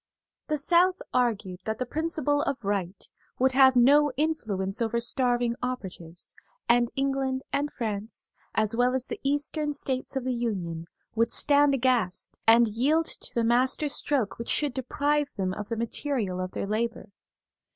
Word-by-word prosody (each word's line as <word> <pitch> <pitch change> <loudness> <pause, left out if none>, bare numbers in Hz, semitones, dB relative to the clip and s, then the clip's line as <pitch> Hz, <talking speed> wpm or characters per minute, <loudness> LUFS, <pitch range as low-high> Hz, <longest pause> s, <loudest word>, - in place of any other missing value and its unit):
The 305 - 0
South 355 +5 +3
argued 215 -7 0
that 220 0 -2
the 255 - -2
principle 305 -2 -1
of 280 -3 -1
right 195 -2 -3 0.3
would 260 +1 +3
have 265 0 +5
no 285 +4 +5
influence 220 -11 -1
over 230 0 0
starving 240 -1 +1
operatives; 185 -9 -5 0.3
and 240 0 +3
England 270 -1 -1
and 285 +1 0
France, 215 -2 -5 0.2
as 215 +1 +1
well 245 +2 +2
as 260 -1 -1
the - - -6
Eastern 295 +2 0
States 265 -2 -2
of 265 - -1
the 255 0 -1
Union, 180 -9 -3 0.3
would 230 +1 +1
stand 285 -1 +5
aghast, 240 -8 0
and 230 +1 +7
yield 280 +10 +1
to - - -6
the 235 - +1
master 255 +5 +2
stroke 275 -6 0
which 235 - -5
should 290 -4 +1
deprive 285 +3 -1
them 185 -1 -1
of 210 +1 -7
the 230 - -3
material 230 -4 -2
of 185 0 -4
their - - -3
labor. 220 +1 -3
245 Hz, 160 wpm, -27 LUFS, 220-280 Hz, 0.3 s, and